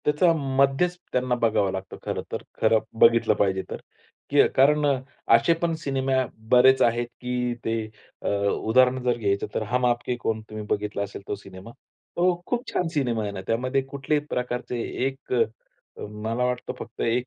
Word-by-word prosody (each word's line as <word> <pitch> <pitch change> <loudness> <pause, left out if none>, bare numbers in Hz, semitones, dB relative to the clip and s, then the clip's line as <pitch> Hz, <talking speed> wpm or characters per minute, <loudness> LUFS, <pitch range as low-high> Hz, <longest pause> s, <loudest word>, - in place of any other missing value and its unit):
त्याचा 150 +4 +4 0.2
मध्यच 140 +7 +2
त्यांना 125 0 +1
बघावं 105 -4 +2
लागतो 95 0 -6
खरं - - -2
तर. - - -4 0.2
खरं 110 - +5 0.2
बघितलं 115 -1 +5
पाहिजे 95 -1 +1
तर. - - -5 0.5
की 145 0 +5
कारण 145 +3 +4 0.5
असे 170 - +4
पण 170 -1 +1
सिनेमे 135 -3 -1 0.4
बरेच 130 +1 +6
आहेत 120 0 +2
की 125 -1 -1
ते 115 - 0 0.5
अ, - - -4
उदाहरण 115 +6 +2
जर 125 -1 +1
घ्यायचं 100 -3 0
तर, - - 0
हम 125 +4 0
आपके 120 0 0
है 125 - -1
कौन 110 -1 -1
तुम्ही 110 -1 -6
बघितला 105 -1 -1
असेल 100 0 -7
तो - - -2
सिनेमा. 95 +1 -12 0.5
तो 175 0 +2
खूप 245 +1 -2
छान 180 - +1
सिनेमा 120 -7 0
आहे 105 - -3
ना. 95 - -6
त्यामध्ये 130 +4 +1
कुठल्याही 140 +2 -2
प्रकारचे 125 0 -3 0.3
एक 135 -1 -4 0.6
मला 110 +3 -3
वाटतं 125 0 -2
फक्त 115 - -9
एक 120 +2 +1
125 Hz, 165 wpm, -25 LUFS, 110-135 Hz, 0.6 s, बरेच